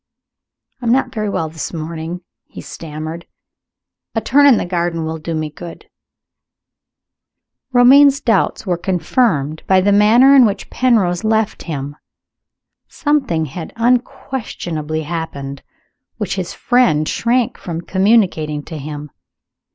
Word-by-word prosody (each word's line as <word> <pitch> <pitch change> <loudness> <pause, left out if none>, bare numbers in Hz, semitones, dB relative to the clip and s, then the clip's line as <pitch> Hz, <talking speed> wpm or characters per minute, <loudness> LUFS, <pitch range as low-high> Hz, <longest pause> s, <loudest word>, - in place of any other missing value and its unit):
"I 240 - -4
am - - +3
not 255 0 +1
very 215 -3 -2
well 165 -5 -2
this 155 -2 -6
morning," 165 +1 -6 0.3
he - - -11
stammered; 160 +1 -8 0.9
"a - - +2
turn 285 +6 +4
in 260 -5 +6
the - - -2
garden 170 -2 -2
will 160 0 -4
do 165 +1 -4
me 155 -1 -3
good." 170 +3 -11 1.8
Romayne's 270 +3 +6
doubts 225 -3 0
were 175 -3 -1
confirmed 165 - 0
by 190 0 +4
the 200 +2 +2
manner 230 +7 +6
in 265 - +8
which 205 -4 -1
Penrose 210 -9 +1
left 220 -1 0
him. 145 -3 -5 0.9
Something 275 - 0
had 160 +4 -8
unquestionably 225 - -2
happened, 140 -4 -5 0.6
which - - -3
his - - -4
friend 235 -12 +2
shrank 240 0 0
from 170 -2 -5
communicating 185 -6 +1
to 160 -1 -8
him. 145 0 -7
175 Hz, 130 wpm, -17 LUFS, 160-235 Hz, 1.8 s, in